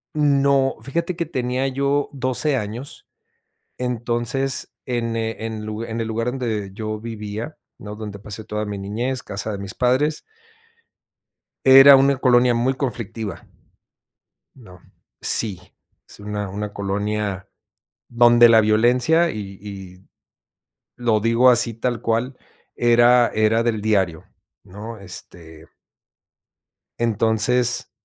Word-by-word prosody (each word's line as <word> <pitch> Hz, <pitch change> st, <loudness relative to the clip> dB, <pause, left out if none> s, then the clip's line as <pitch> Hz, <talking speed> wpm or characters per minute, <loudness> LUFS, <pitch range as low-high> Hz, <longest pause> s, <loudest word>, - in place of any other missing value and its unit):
no, 140 Hz, -2 st, +2 dB
fíjate 170 Hz, +7 st, -3 dB
que 170 Hz, -, -1 dB
tenía 130 Hz, -3 st, -2 dB
yo 140 Hz, +2 st, 0 dB
12 135 Hz, +2 st, -1 dB
años, 115 Hz, +4 st, -6 dB, 0.7 s
entonces, 125 Hz, +2 st, -2 dB
en, 115 Hz, -2 st, -2 dB
eh, 110 Hz, 0 st, -4 dB
en 110 Hz, -1 st, -5 dB
lug 110 Hz, +1 st, -5 dB
en 115 Hz, 0 st, -5 dB
el 115 Hz, -, -2 dB
lugar 115 Hz, +2 st, -2 dB
donde 115 Hz, -6 st, -3 dB
yo 110 Hz, +1 st, -5 dB
vivía, 110 Hz, +4 st, -6 dB, 0.2 s
¿no?, 105 Hz, 0 st, -9 dB
donde 105 Hz, -2 st, -8 dB
pasé 105 Hz, +1 st, -8 dB
toda 105 Hz, 0 st, -4 dB
mi 105 Hz, -1 st, -5 dB
niñez, 120 Hz, +6 st, -3 dB
casa 100 Hz, +2 st, -4 dB
de 100 Hz, -, -4 dB
mis 100 Hz, -1 st, -6 dB
padres 130 Hz, +5 st, +1 dB, 1.5 s
era 135 Hz, +1 st, +10 dB
una 135 Hz, +1 st, +4 dB
colonia 125 Hz, -1 st, +3 dB
muy 125 Hz, +3 st, 0 dB
conflictiva. 115 Hz, -, -5 dB, 1.1 s
No, 90 Hz, -8 st, -16 dB, 0.4 s
sí, 100 Hz, -6 st, +2 dB, 0.5 s
es -, -, -12 dB
una 105 Hz, -1 st, -4 dB
una 105 Hz, +1 st, -5 dB
colonia 100 Hz, -1 st, -3 dB, 0.6 s
donde 120 Hz, 0 st, +6 dB
la 115 Hz, -1 st, +6 dB
violencia 125 Hz, +10 st, +3 dB
y 100 Hz, -5 st, -7 dB
y 95 Hz, -2 st, -11 dB, 0.9 s
lo 115 Hz, -3 st, +1 dB
digo 115 Hz, +3 st, +4 dB
así 120 Hz, -1 st, +4 dB
tal 120 Hz, 0 st, -2 dB
cual, 120 Hz, +3 st, -1 dB, 0.4 s
era 120 Hz, +1 st, +4 dB
era 110 Hz, +1 st, +2 dB
del 110 Hz, -3 st, -1 dB
diario, 95 Hz, -7 st, 0 dB, 0.4 s
¿no? 105 Hz, +3 st, -9 dB
Este 80 Hz, -4 st, -10 dB, 1.3 s
entonces, 115 Hz, +2 st, +1 dB
115 Hz, 120 wpm, -21 LUFS, 105-125 Hz, 1.5 s, era